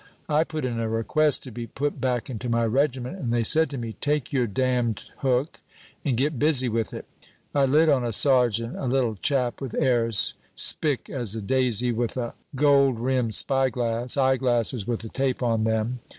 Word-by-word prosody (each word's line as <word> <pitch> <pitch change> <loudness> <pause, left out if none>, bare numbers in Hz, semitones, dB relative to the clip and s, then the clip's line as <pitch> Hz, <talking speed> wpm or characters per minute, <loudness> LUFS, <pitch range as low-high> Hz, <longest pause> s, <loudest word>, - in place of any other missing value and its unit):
I 155 0 +2
put 155 -3 -5
in 120 -2 -2
a 115 -1 -2
request 125 +7 +1
to 130 - -9
be 115 +1 -6
put 145 +6 -3
back 125 -2 -1
into 125 -2 -5
my 115 0 +1
regiment, 130 - -1
and 120 -7 -3
they 120 -1 +1
said 160 +7 +2
to 140 - -6
me, 115 -2 -5
'Take 150 -2 -1
your 125 -3 +1
damned 120 -1 -1
hook, 130 +3 -1 0.4
and 135 -6 0
get 140 +1 0
busy 145 -4 +3
with 115 -1 -1
it.' - - -7 0.5
I 140 -1 +3
lit 150 +5 +3
on 140 -5 +3
a 120 - -2
sergeant, 120 -1 +3
a - - -4
little 125 -3 +1
chap 125 - -1
with 135 -3 -5
airs, 115 -6 +2 0.2
spick 145 -5 +1
as 120 -6 -2
a - - -3
daisy, 125 0 +1
with 120 +2 -2
a 120 -2 -3 0.2
gold 140 -3 +3
rimmed 125 -2 0
spy 135 -1 +2
glass 120 +1 -1
eye 130 -1 +3
glasses 120 -4 0
with 120 -2 -2
a 115 - -7
tape 130 0 -1
on 115 -2 +1
them. 110 +3 -1
125 Hz, 195 wpm, -25 LUFS, 115-135 Hz, 0.5 s, busy